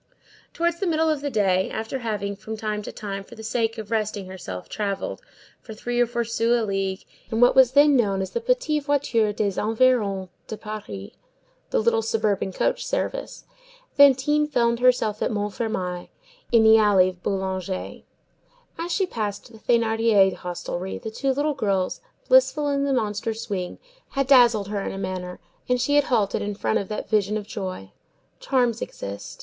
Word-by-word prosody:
Towards 340 0 -1
the 390 - -1
middle 320 -1 +2
of 300 -2 -2
the 285 - -2
day, 190 -6 +1
after 225 +4 -4
having, 205 -4 -3
from 220 +2 -7
time 210 -1 -3
to - - -7
time, 195 -2 -6
for 235 - -14
the 220 - -10
sake 225 0 -1
of 220 0 -7
resting 215 -3 -1
herself, 175 - -7
travelled, 200 -2 -3 0.4
for 220 - -10
three 240 +2 -1
or 240 - +3
four 235 0 -1
sous 230 +1 +1
a 225 - -1
league, 195 -1 -2 0.3
in 225 - -1
what 245 +1 +5
was 260 -1 +6
then 290 0 +6
known 200 -6 +2
as 190 - -6
the 470 - -2
Petites 455 - 0
Voitures 235 -7 +1
des 200 -3 -1
Environs 215 -4 +2 0.2
de 220 - -6
Paris, 210 - -7 0.6
the - - 0
"little 225 0 +2
suburban 215 -3 0
coach - - 0
service," - - -3 0.5
Fantine 285 +2 +5
found 235 -5 +1
herself 245 -4 +2
at - - +1
Montfermeil, 205 -3 -3 0.4
in 230 -2 +5
the 220 0 +7
alley 195 -3 +4
Boulanger. 190 -1 -3 0.8
As 340 +1 -3
she 385 - +1
passed 215 - -4
the 220 - -14
Thénardier 225 -4 +3
hostelry, 180 +1 -5
the 220 - -7
two 270 +4 -1
little 290 +3 0
girls, 195 -8 -1 0.3
blissful - - +4
in 280 0 0
the 280 - 0
monster 220 -2 -1
swing, 195 -5 -4 0.3
had 275 -1 0
dazzled 240 -6 +5
her 205 -1 -2
in - - -4
a - - -6
manner, 185 -2 -5 0.3
and 250 0 +2
she 260 +4 0
had 290 -1 +4
halted 210 -6 +1
in 205 0 -3
front 220 - 0
of 200 - -5
that 210 - -5
vision 210 -1 +1
of 210 - -6
joy. 185 - -6 0.5
Charms 245 -4 +1
exist. 100 0 -7
220 Hz, 175 wpm, -24 LUFS, 200-255 Hz, 0.8 s, the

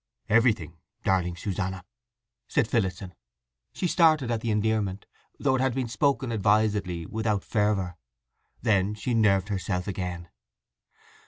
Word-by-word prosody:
"Everything, 110 -8 +2 0.3
darling 90 -2 +1
Susanna," 95 -1 -3 0.6
said 110 - +1
Phillotson. 95 -5 -1 0.6
She - - -4
started 155 -7 +4
at 115 -2 -1
the 115 - -2
endearment, 105 -2 0 0.3
though 135 - +1
it 130 - +1
had 130 -2 +1
been 130 -2 -1
spoken 135 +1 0
advisedly 105 -5 +1
without 110 -1 -1
fervour. 100 -5 0 0.7
Then 105 -3 +2
she 120 +3 -2
nerved 100 -4 +3
herself 95 -2 -2
again. 90 -3 -4
105 Hz, 120 wpm, -27 LUFS, 95-115 Hz, 0.7 s, started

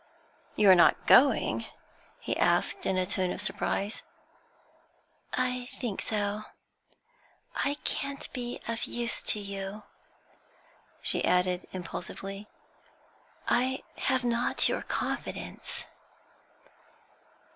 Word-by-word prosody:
'You 210 - +4
are - - +11
not 175 - +5
going?' 275 +2 +5 0.5
he - - -2
asked, 390 - +2
in 190 - +1
a 185 - +2
tone 185 -1 +1
of - - -4
surprise. 205 0 0 1.3
'I 250 -1 0
think 235 -7 -3
so; 210 0 -1 1.1
I 285 - +1
can't 280 0 -2
be 245 -2 -4
of 230 0 -2
use 235 -1 -2
to 215 - 0
you,' 200 +1 -5 1.2
she - - +4
added, 180 0 +2
impulsively; 195 +3 -6 1.0
'I 260 +2 +2
have 260 -2 +1
not 240 0 +2
your - - 0
confidence.' - - -4
215 Hz, 100 wpm, -29 LUFS, 195-250 Hz, 1.3 s, are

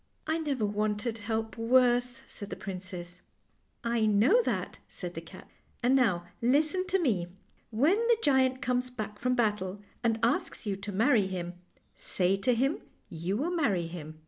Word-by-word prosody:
" - - -44
" - - -41
I 320 +1 +1
never 280 -8 -1
wanted 210 +2 -1
help 220 +1 -3
worse," 245 +1 +3
said 205 - -8
the - - -4
princess. 180 -2 -7 0.3
" - - -43 0.2
I 220 - +3
know 225 - +5
that," - - -3
said - - -7
the - - -6
cat; - - -13 0.2
" - - -37
and 250 +2 +4
now 195 -10 +2 0.2
listen 305 +9 +2
to 385 - +2
me. 210 - +1 0.4
When 285 - +3
the 470 -1 +5
giant 260 -2 +3
comes 250 -1 0
back 210 -4 -6
from 250 0 +1
battle 210 -5 0 0.2
and 225 -2 +2
asks 240 0 0
you 200 -2 -1
to 205 +1 -6
marry 220 0 +3
him, 175 -2 -4 0.4
say 185 +1 0
to 245 +5 +2
him 270 +6 +1 0.3
you 170 +5 -2
will 310 +8 -1
marry 225 - +1
him." 155 -2 -8
225 Hz, 180 wpm, -29 LUFS, 195-260 Hz, 0.4 s, know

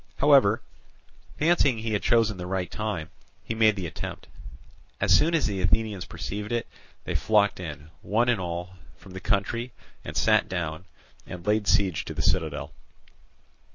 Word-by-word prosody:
However, 135 -7 +5 0.7
fancying 150 -6 +3
he 110 0 -3
had 105 - 0
chosen 115 -4 +2
the 90 0 -6
right 90 -1 -2
time, 100 -7 -4 0.3
he - - -3
made 110 -1 +4
the 95 -3 -4
attempt. 80 - -6 0.7
As - - +4
soon 165 +2 +3
as 160 - +2
the 100 -3 -2
Athenians 100 +2 0
perceived 105 +2 -5
it, 120 -1 0 0.4
they - - -4
flocked 105 -3 +2
in, 75 -3 -8
one 115 +5 +1
and 120 -5 +2
all, 90 0 -4 0.3
from 95 - -15
the 95 - -7
country, 110 +5 -1 0.3
and - - -6
sat - - +3
down, 85 -1 -3 0.4
and 90 -1 -8
laid 105 0 +1
siege 95 -6 +2
to - - -6
the - - -2
citadel. - - -1
105 Hz, 160 wpm, -26 LUFS, 90-115 Hz, 0.7 s, However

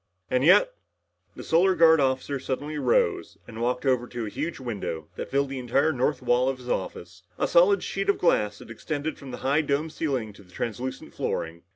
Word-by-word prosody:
And 125 0 +2
yet - - +6 0.3
" - - -45
The - - -8
Solar 185 +3 +3
Guard 160 -1 +6
officer 135 +1 0
suddenly 145 +4 -4
rose 460 - +1
and 115 0 -8
walked 125 +3 -1
over 125 -2 +2
to 120 -2 -5
a - - -4
huge 160 +9 -4
window 100 - -5
that - - -6
filled 140 0 +1
the 135 -1 -4
entire 135 +6 +1
north 130 +2 0
wall 125 +1 +3
of 135 - -3
his 125 -1 -11
office, 90 -1 -4 0.2
a - - +1
solid 180 +3 +4
sheet 195 0 -2
of 200 - +3
glass 105 -11 +2
that - - -12
extended 150 +6 -4
from 140 - -10
the 125 - -6
high 140 +4 +3
domed 150 +2 -1
ceiling 130 -10 -2
to 100 - -16
the 90 -2 -20
translucent 120 +6 -5
flooring. 85 +1 -3
135 Hz, 210 wpm, -26 LUFS, 120-160 Hz, 0.3 s, yet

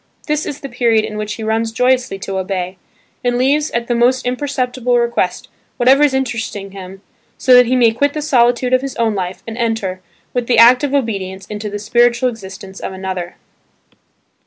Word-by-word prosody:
This 300 0 -1
is 285 - -6
the 275 - -5
period 235 -3 +1
in 215 -1 -7
which 210 0 -4
he 220 - -7
runs 225 +1 0
joyously 250 -3 +1
to 195 -1 -3
obey, 185 -1 -4 0.4
and 245 0 +1
leaves 285 +4 +2
at 235 0 -2
the 240 - -1
most 245 +2 +2
imperceptible 250 -1 -1
request 235 -1 -1 0.3
whatever 260 +3 +4
is 290 -3 +3
interesting 220 -6 -3
him 195 0 -10 0.3
so 260 - +3
that 250 -1 +7
he 255 - +2
may 235 -3 +4
quit 285 +5 0
the 305 - -3
solitude 245 -3 +2
of 255 - +4
his 275 -1 -5
own 230 -2 +1
life 185 -2 -4
and 230 +1 -7
enter, 220 -6 -2 0.3
with 245 -2 -1
the 240 - +2
act 245 +4 +7
of 285 -1 0
obedience 195 -7 -2
into 210 0 -6
the 205 - -4
spiritual 240 +3 +2
existence 195 -3 -10
of - - -5
another. 185 -2 -5
235 Hz, 190 wpm, -17 LUFS, 205-255 Hz, 0.4 s, that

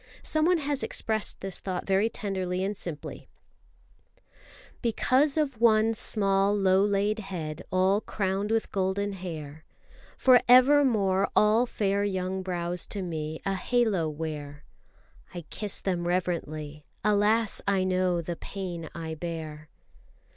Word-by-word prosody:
Someone 325 +3 +2
has 285 -3 -2
expressed 220 -1 -1
this 195 -1 -3
thought 185 -2 -4
very 195 +3 +2
tenderly 190 -4 -3
and 200 +2 -2
simply: 165 -6 -7 1.5
Because 260 +5 +2
of 275 -7 -1
one 225 -1 +4
small 200 -2 +2
low 190 -1 +4
laid 205 +1 +1
head, 175 -5 -5
all 190 +3 +3
crowned 195 0 -2
With 225 0 0
golden 200 +1 -1
hair, 160 -5 -7 0.5
For 255 -2 +6
evermore 245 -7 +5
all 220 +4 +4
fair 200 -2 0
young 190 -1 -2
brows 175 -1 -3
to 200 -2 -3
me 160 -2 -5
A 195 - 0
halo 200 -5 +1
wear. 150 -1 -6 0.7
I 175 - -4
kiss 210 -2 -5
them 175 -3 -2
reverently. 155 -4 -2 0.2
Alas, 210 +2 +2
I 195 -2 +2
know 185 -2 +1
The 170 +1 -4
pain 175 -3 -6
I 165 -1 -5
bear! 155 -2 -6
195 Hz, 125 wpm, -27 LUFS, 175-215 Hz, 1.5 s, For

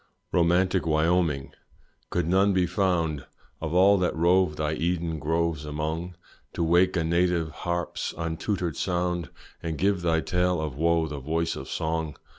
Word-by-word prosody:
Romantic 90 +1 +2
Wyoming! 80 -2 +1 0.6
could 90 -2 -1
none 95 +3 +3
be 95 -1 +3
found 85 -6 0 0.3
Of 80 +1 -3
all 100 +2 +6
that 90 - 0
rove 85 0 +3
thy 75 0 -1
Eden 85 0 -1
groves 80 0 0
among, 80 +4 -4 0.4
To 85 - -1
wake 90 +3 +3
a 85 - +1
native 85 -1 +1
harp's 85 +2 -3
untutored 85 +1 -2
sound, 90 -3 -1 0.3
And 80 -2 -3
give 100 +1 +1
thy 80 -1 +1
tale 90 0 +1
of 75 -4 -3
wo 85 +2 +2
the 75 -2 -5
voice 80 +4 -1
of - - -8
song? 80 -1 -2
85 Hz, 150 wpm, -26 LUFS, 80-90 Hz, 0.6 s, all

